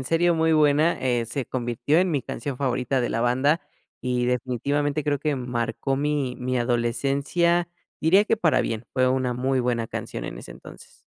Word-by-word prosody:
en 130 - -6
serio, 170 +3 +2
muy 160 0 +2
buena. 155 +2 +3
Eh, 120 -3 0
se 125 +2 -3
convirtió 125 +5 0
en 185 -1 +2
mi 140 -5 0
canción 130 +2 -5
favorita 130 -1 0
de 120 - -1
la 115 - -1
banda 130 +6 +2 0.4
y 125 -1 0
definitivamente 140 +4 -1
creo 145 -1 +1
que 150 -3 0
marcó 125 +2 -2
mi 145 -3 -1
mi 125 0 -1
adolescencia, 140 +9 +1 0.3
diría 190 +6 +5
que 225 - +1
para 165 -7 +2
bien, 115 +1 -3
fue 130 -1 +2
una 130 -1 0
muy 130 +1 0
buena 120 -2 -1
canción - - -6
en - - -6
ese - - -10
entonces. - - -13
130 Hz, 185 wpm, -24 LUFS, 125-150 Hz, 0.4 s, diría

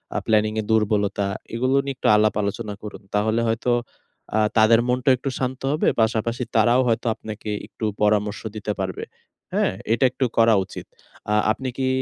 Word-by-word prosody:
আ - - +1
প্ল্যানিংয়ের 110 0 +1
দুর্বলতা, 105 -2 +1 0.3
এগুলো 130 +3 +1
নিয়ে 135 -1 -3
একটু - - -1
আলাপ 105 0 +3
আলোচনা 100 +1 -3
করুন। 105 - -8
তাহলে 110 +2 +1
হয়তো 115 +2 0 0.7
আ - - +4 0.2
তাদের 110 +1 +6
মনটাও 125 +1 +3
একটু 135 - -3
শান্ত 130 0 -3
হবে। 155 - +1
পাশাপাশি 115 +2 0
তারাও 120 +3 +4
হয়তো 115 +1 0
আপনাকে 110 0 -8 0.2
একটু 110 - -6 0.2
পরামর্শ 105 0 +1
দিতে 105 0 -3
পারবে, 95 -2 -3 0.5
হ্যাঁ? - - +1 0.2
এটা 120 - +1
একটু 130 +1 -1
করা 115 -1 +5
উচিত। - - -9 0.5
আ - - +3 0.2
আপনি 130 +4 -4
কি 130 -1 0
110 Hz, 165 wpm, -23 LUFS, 105-125 Hz, 0.7 s, তাদের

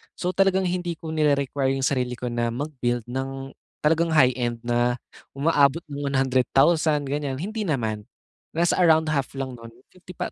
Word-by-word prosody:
So, 180 - -2
talagang 190 0 +2
hindi 175 -1 -2
ko 160 0 -7
nire-require 140 -3 +1
yung 135 - -3
sarili 125 -3 -1
ko 125 0 -4
na 120 0 0
mag-build 125 -3 -2
ng 135 +1 -4 0.3
talagang 165 +2 +2
high-end 125 -4 +2
na 120 0 +1 0.4
umaabot 145 +1 +3
ng 145 0 -3
100,000 140 +4 +2
ganyan, 145 -1 -2
hindi 215 +6 -3
naman. 110 -8 -2 0.5
Nasa 170 +2 +2
around 160 -3 +4
half 140 -2 -2
lang 135 -1 -3
nun 115 - -10 0.2
fifty 180 0 -14
thou - - -4
140 Hz, 155 wpm, -24 LUFS, 125-160 Hz, 0.5 s, around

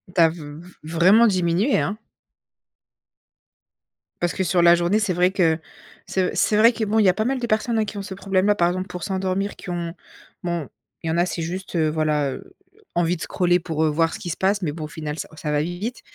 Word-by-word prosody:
Tu 175 - +4
as 165 - +7
v 155 -1 -9
v 180 - -14 0.2
vraiment 195 +8 +6
diminué, 185 +5 +1
hein! 205 +2 -2 2.2
Parce 175 -1 0
que 190 - -1
sur 175 0 +2
la 170 0 +7
journée, 175 +5 +1
c'est 210 -4 0
vrai 180 +2 +3
que 165 -4 +2 0.5
c'est 185 -1 -1
c'est 210 - +2
vrai 230 +3 +6
que, 225 - -3
bon, 220 +2 +1
il - - +5
y 190 - +6
a - - +4
pas 215 +3 -1
mal 265 +1 0
de 240 - -3
personnes, 225 +2 0
hein, 220 - +2
qui 205 0 -7
ont - - -3
ce 195 0 -7
problème-là. 195 +1 +1
Par 170 -3 +3
exemple 185 +2 -3
pour 180 -1 -7
s'endormir 190 +1 -2
qui - - -10
ont 170 -1 -3 0.5
bon, 170 -5 -2 0.4
il - - -4
y 160 - +1
en 170 - 0
a 175 - +3
c'est 175 -2 -4
juste, 185 +3 -5
heu 160 -2 +2
voilà, 150 -3 0
heu, 380 - -10 0.4
envie 175 0 +2
de 160 - -11
scroller 180 -1 +1
pour, 160 -2 -2
heu, - - +3
voir 165 +2 +1
ce - - -6
qu'il 175 - -5
se - - -5
passe, 200 +1 +1
mais 155 - 0
bon 155 0 -6
au - - -6
final 155 0 -6
ça - - -4
ça 150 -1 -4
va 150 0 +2
vite. 180 +9 -4
180 Hz, 245 wpm, -23 LUFS, 165-200 Hz, 2.2 s, as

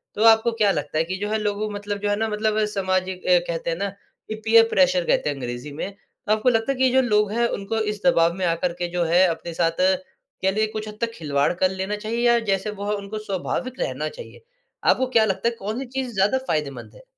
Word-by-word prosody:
तो 215 - 0
आपको 225 +1 +6
क्या 205 -2 +5
लगता 155 -2 -3
है 160 - +3
कि 185 +3 -4
जो 205 +2 -3
है 220 - +1
लोगों 210 0 -1
मतलब 205 0 -4
जो 205 - 0
है 205 - +2
ना 225 +2 -1
मतलब 215 0 0
सामाजिक 190 -2 -2
अ, 180 -1 +6
कहते 170 0 -3
हैं 165 - -1
ना, 200 +2 -2
की 200 +2 -11
पीयर 225 0 +6
प्रेशर 230 -11 +3
कहते - - +1
हैं 145 - -2
अंग्रेजी 125 +2 -6
में। 160 +7 -5 0.4
तो - - +1
आपको 215 +4 +3
लगता 225 +2 +1
है 270 - -3
कि 260 - +1
ये 260 - +5
जो 265 +1 +4
लोग 210 -4 +2
है 235 +2 +2
उनको 200 +3 -2
इस 210 - -12
दबाव 170 -10 +4
में 185 +1 -2
आकर 170 +1 0
के 175 0 -3
जो 175 0 0
है 175 +3 +4
अपने 170 0 -4
साथ 165 0 +1 0.7
कह 190 - +3
लीजिए 215 +2 +1
कुछ 215 0 -5
हद 210 0 -9
तक 230 0 0
खिलवाड़ 145 -6 0
कर 185 +1 +2
लेना 190 +2 -3
चाहिए? 215 +2 -4
या 235 0 +5
जैसे 205 -2 -1
वो 205 0 -4
उनको 200 +1 -6
स्वाभाविक 215 +6 -4
रहना - - -2
चाहिए? 485 0 -12 0.4
आपको 260 - +3
क्या 220 -1 +6
लगता 195 +3 0
है 235 - -8
कौन-सी 220 +7 -4
चीज़ 255 -1 -4
ज़्यादा 205 +5 +2
फ़ायदेमंद 140 -6 -3
है? - - -15
205 Hz, 245 wpm, -23 LUFS, 180-220 Hz, 0.7 s, आपको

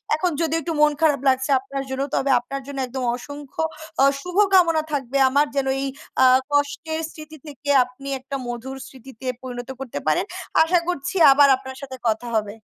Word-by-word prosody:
এখন 350 +2 0
যদি 325 -1 0
একটু 330 - -4
মন 300 - +6
খারাপ 300 -3 +3
লাগছে 260 +1 +1
আপনার 270 +1 -5
জন্য, 265 +1 -3
তবে 275 0 +1
আপনার 275 +3 -6
জন্য 280 - -7
একদম 260 +1 -5
অসংখ্য 285 +3 -7 0.4
আ - - +6 0.2
শুভ 360 +2 -7 0.2
কামনা 335 -4 +5
থাকবে 275 -1 -1
আমার 285 +3 +3
যেন, 275 -1 0 0.2
এই 275 - -1 0.4
আ - - +7 0.3
কষ্টের 305 +3 0
স্মৃতি 310 0 -11
থেকে 290 0 -8
আপনি 250 +2 -12
একটা 270 +2 -7
মধুর 240 +3 -6
স্মৃতিতে 260 -1 -13 0.2
পরিণত 245 -1 -7
করতে 250 - -5
পারেন। 155 - +2 0.4
আশা 345 +2 +3
করছি 355 +1 -3 0.2
আবার 285 +1 +6
আপনার - - -18 0.2
সাথে 265 -1 -8
কথা 225 +2 -1
হবে। 215 0 -2
275 Hz, 180 wpm, -22 LUFS, 260-300 Hz, 0.4 s, আ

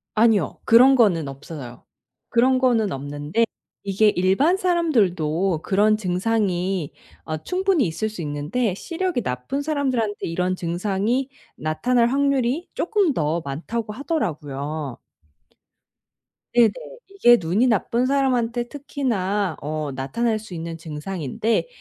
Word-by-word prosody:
아니요. 215 -6 +3
그런 255 +4 +7
거는 180 - +3
없어요. 135 -3 -9 0.5
그런 255 +2 +3
거는 230 -6 +2
없는데 145 +10 -1 0.4
이게 200 +2 +3
일반 205 - +2
사람들도 195 - +1
그런 210 +2 +3
증상이 185 -3 -1 0.3
어 155 -1 -3
충분히 365 - +1
있을 215 +7 -2
수 210 -5 -7
있는데 155 +9 -1
시력이 340 - -2
나쁜 125 - -3
사람들한테 260 - -1
이런 180 +2 -1
증상이 200 +9 -1 0.3
나타날 235 +10 +1
확률이 275 +3 +1
쪼끔 380 -5 +1
더 160 0 0
많다고 210 +10 -4
하더라고요. 155 - -3 1.6
네네. 235 -2 +6 0.4
이게 240 -12 +5
눈이 190 +9 +1
나쁜 235 +2 +1
사람한테 245 -3 +1
특히나 210 - -2
어 150 0 -3
나타날 215 - -1
수 210 -4 -11
있는 165 0 -5
증상인데 165 - -2
210 Hz, 270 characters per minute, -23 LUFS, 165-250 Hz, 1.6 s, 그런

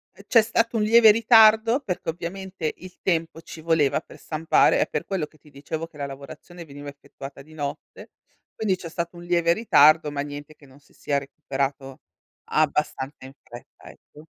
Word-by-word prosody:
Ehm, 200 - -16
c'è 230 - +6
stato 230 +1 0
un 220 - +1
lieve 225 +1 +7
ritardo, 225 +2 +5
perché 185 -12 -5
ovviamente 180 0 -5
il 185 0 -13
tempo 165 -3 -1
ci 165 - -11
voleva 155 -4 +1
per - - -16
stampare. 160 0 +2
È - - +2
per - - -3
quello 190 -6 -3
che 155 - -25
ti 150 +1 -21
dicevo 150 +3 -6
che 165 -2 -22
la 140 -1 -4
lavorazione 140 +5 -11
veniva 145 -1 -11
effettuata 140 -1 -11
di 155 +3 -18
notte. 145 -1 -7 0.4
Quindi. 205 -4 -1
c'è 175 - -9
stato 170 +1 -5
un 175 - -10
lieve 170 -1 +2
ritardo 155 -7 +4
ma 145 - -3
niente 145 +1 -8
che 145 - -20
non 135 +1 -19
si 145 - -27
sia 140 -1 -2
recuperato 135 -1 -5 0.4
abbastanza 150 -3 -1
in 130 - -11
fretta, 120 0 -14
ecco. 150 +1 -18
160 Hz, 185 wpm, -24 LUFS, 145-185 Hz, 0.4 s, lieve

